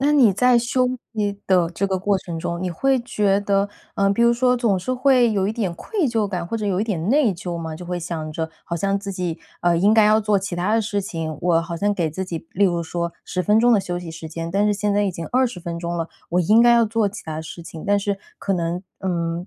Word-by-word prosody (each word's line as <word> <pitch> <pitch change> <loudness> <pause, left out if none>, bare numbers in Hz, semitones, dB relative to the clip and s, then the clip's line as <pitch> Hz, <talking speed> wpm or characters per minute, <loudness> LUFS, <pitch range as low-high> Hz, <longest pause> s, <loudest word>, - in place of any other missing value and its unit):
那 285 +2 +3
你 250 -8 +6
在 250 +4 +4
休息 240 -4 -1
的 180 -3 +3
这 190 +3 -1
个 190 -1 -1
过 200 0 +1
程 170 -2 -6
中， 170 +1 -3
你 185 - -2
会 265 +10 +1
觉 210 -5 +1
得 200 0 +1 0.3
呃， 195 0 +2
比 235 - +1
如 235 0 +5
说 250 +1 +2
总 230 -5 +2
是 185 +8 -2
会 255 -2 +4
有 195 -2 +1
一 210 - -1
点 210 -7 -2
愧 405 - -5
疚 225 -3 0
感 180 -3 -3
或 230 +7 -3
者 215 - -3
有 190 -1 0
一 - - +1
点 185 -4 -2
内 270 -4 +4
疚 175 -1 -5
吗？ 160 -1 -5
就 175 +1 -9
会 180 0 -2
想 160 -3 -5
着 160 +1 -3
好 170 - -4
像 195 +4 0
自 200 0 -6
己， 180 -3 -3 0.2
呃， 175 -1 +3
应 205 +4 +4
该 220 -1 +6
要 215 +1 +5
做 210 -1 +2
其 190 -2 -3
它 190 +5 +1
的 225 - +3
事 205 -1 -1
情， 165 -5 -5
我 165 -1 +2
好 170 0 -5
像 205 +3 +1
给 170 -5 -1
自 190 +5 -4
己 170 -3 -6
例 200 +2 +2
如 175 -2 +1
说 170 +1 -3
10 185 - -3
分 210 +5 +3
钟 240 +1 +5
的 220 - +5
休 180 -2 -3
息 175 -2 -6
时 160 0 -8
间， 165 +1 -5
但 200 +3 +2
是 210 - +3
现 205 0 0
在 205 +1 +2
已 195 - -1
经 170 -1 -6
20 250 -7 0
分 170 0 -5
钟 170 0 -3
了， 165 -1 -3 0.2
我 180 +1 +2
应 210 +7 +5
该 240 0 +6
要 235 -1 +5
做 220 -1 +1
其 205 +2 -9
它 155 -1 -5
的 160 - -4
事 165 +2 -9
情。 160 -1 -9
但 205 0 +3
是 200 0 -1 0.2
可 195 - -1
能， 175 0 -2 0.2
嗯， 170 -1 -2
195 Hz, 290 characters per minute, -22 LUFS, 170-215 Hz, 0.3 s, 你